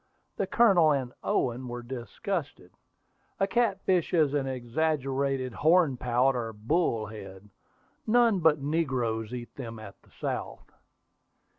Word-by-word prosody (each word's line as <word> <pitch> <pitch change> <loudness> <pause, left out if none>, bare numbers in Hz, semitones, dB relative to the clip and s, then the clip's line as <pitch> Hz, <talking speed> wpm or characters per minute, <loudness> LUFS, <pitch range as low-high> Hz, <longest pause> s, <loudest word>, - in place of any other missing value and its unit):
The 195 - -1
Colonel 185 -10 +5
and 130 -3 -2
Owen 125 +1 -1
were 120 0 -6
disgusted. 130 - -5 0.7
A 195 - +3
catfish 195 -5 +1
is 150 -4 +3
an 140 -2 0
exaggerated 135 0 -1
hornpout, 135 -5 +3
or 115 -2 -3
"bullhead." 110 - -2 0.6
None 230 -3 +4
but 160 -2 +4
negroes 130 -7 -1
eat 120 -1 -7
them 115 -4 -6
at 110 -2 -11
the - - -25
South. - - -5
135 Hz, 115 wpm, -28 LUFS, 120-165 Hz, 0.7 s, Colonel